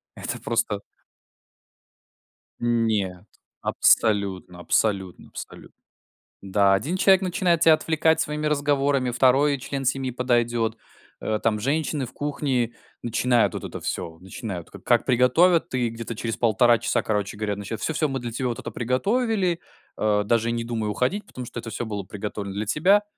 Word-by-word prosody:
Это - - -2
просто 115 -3 -1 1.8
Нет. 110 -6 0 0.4
Абсолютно, 100 -5 +2
абсолютно, 95 0 0
абсолютно. - - -10 0.7
Да, 100 0 +3
1 145 - 0
человек 190 0 +5
начинает 175 -2 +1
тебя 160 -1 +7
отвлекать 160 +1 +2
своими 150 0 -1
разговорами, 140 -3 +1
2 135 +3 +3
член 135 +1 -4
семьи 135 0 0
подойдет. 120 -2 0 0.4
Э, 110 -1 -1
там, 105 -2 +1
женщины 145 +2 -1
в - - -11
кухне, 135 -5 -1 0.3
начинают 120 +1 +2
вот - - -5
это - - -6
всё. 80 -1 -4
Начинают 95 -1 -7
ка - - -11
как - - +2
приготовят 155 +7 +3
и 120 -2 +1
где-то 115 0 -6
через 115 0 -3
1,5 120 +1 +4
часа, - - 0
короче 105 -2 -1
говоря, 105 -1 -2
начина 105 +2 -5
"Всё, 160 - -2
всё 155 0 +1
мы 135 -1 -3
для 120 -1 -5
тебя 125 +2 -2
вот 120 - -3
это - - -6
приготовили. 185 - 0 0.4
А, 105 -1 +2
даже 115 +2 +1
не 115 0 -2
думай 115 -2 -2
уходить, 125 - -1
потому 125 -1 -8
что 120 - -7
это 115 0 -7
всё 115 +4 -3
было 105 -2 -4
приготовлено 100 0 -6
для 105 +1 -2
тебя". 190 - +3
120 Hz, 155 wpm, -24 LUFS, 105-145 Hz, 1.8 s, тебя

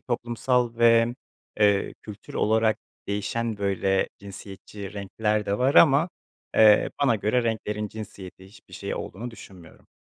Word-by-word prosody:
toplumsal 120 -1 -1
ve, 115 0 +4 0.5
eee, 100 -1 +3
kültür 105 -1 -11
olarak 110 0 +2 0.3
değişen, 110 +3 -2
böyle, 95 -1 0
cinsiyetçi 100 0 -10
renkler 105 +1 -2
de 100 +1 -1
var 130 +3 +2
ama, 150 +3 +6 0.5
eee, 105 -1 +6
bana 125 -5 +3
göre 110 +4 +1
renklerin 105 -2 -2
cinsiyeti, 95 -3 -10
hiçbir 95 - -16
şeyi - - -4
olduğunu 120 +6 -6
düşünmüyorum. 95 -6 -15
105 Hz, 125 wpm, -25 LUFS, 100-115 Hz, 0.5 s, ama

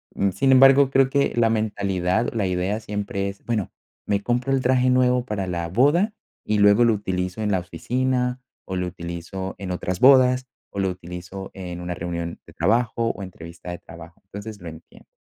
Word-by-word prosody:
Uh, 100 -1 +1
sin 135 +6 +2
embargo, 135 +1 +7
creo 135 -1 +3
que 140 0 +1
la 115 -1 +3
mentalidad 100 -1 0
o - - -13
la 100 -4 +1
idea 90 +4 -1
siempre 100 -2 -3
es: 100 - -11
"Bueno, 110 -6 -2 0.3
me 100 0 0
compro 125 +2 0
el 135 -1 +2
traje 130 0 +3
nuevo 125 -1 +3
para 100 -5 -3
la 85 -1 -2
boda 150 - +3 0.3
y 105 - +1
luego 105 +3 +6
lo 115 -1 +4
utilizo 90 0 -3
en 105 -1 0
la 95 - +2
oficina 125 +8 -1 0.3
o 95 - -4
lo 90 0 -1
utilizo 85 +2 -6
en 95 -2 -5
otras 90 0 -3
bodas 130 -1 +5 0.2
o 100 - -5
lo 95 -1 +1
utilizo 90 +2 -8
en 90 -2 -7
una 90 0 -3
reunión 85 0 -5
de - - -16
trabajo 115 +5 +1
o 100 - -8
entrevista 85 -1 -9
de 90 - -6
trabajo". 85 +1 -13
Entonces, 100 +1 -8
lo 85 - -7
entiendo. 80 +1 -15
100 Hz, 195 wpm, -23 LUFS, 90-125 Hz, 0.3 s, embargo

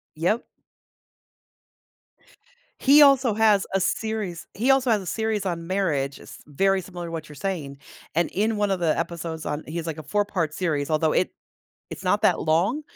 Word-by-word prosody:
Yep. 180 +9 0 2.3
He 285 +2 +6
also 270 -5 +6
has 215 -3 +3
a 195 - +3
series 205 -3 -2
he 240 +7 -1
also 265 -3 +4
has 210 -2 +2
a - - -9
series 220 0 -1
on 170 -2 -3
marriage. 155 -8 -1
It's - - -12
very 195 +6 +1
similar 175 -2 -8
to - - -7
what 160 -2 -5
you're 150 - -12
saying, 145 -6 -4 0.3
and 170 +2 +1
in 215 +2 0
one 205 -1 +1
of 190 -2 0
the 160 -3 +1
episodes 165 -1 -4
on 150 +1 -3
he 165 +2 -5
has 165 0 -4
like, 160 -1 -4
a 155 - -7
4 205 +7 0
part 165 -7 -2
series 150 -5 -1
although 155 0 +2
it 180 - +1 0.6
it's - - -8
not - - +2
that - - +3
long, 185 - +1
180 Hz, 185 wpm, -24 LUFS, 160-210 Hz, 2.3 s, He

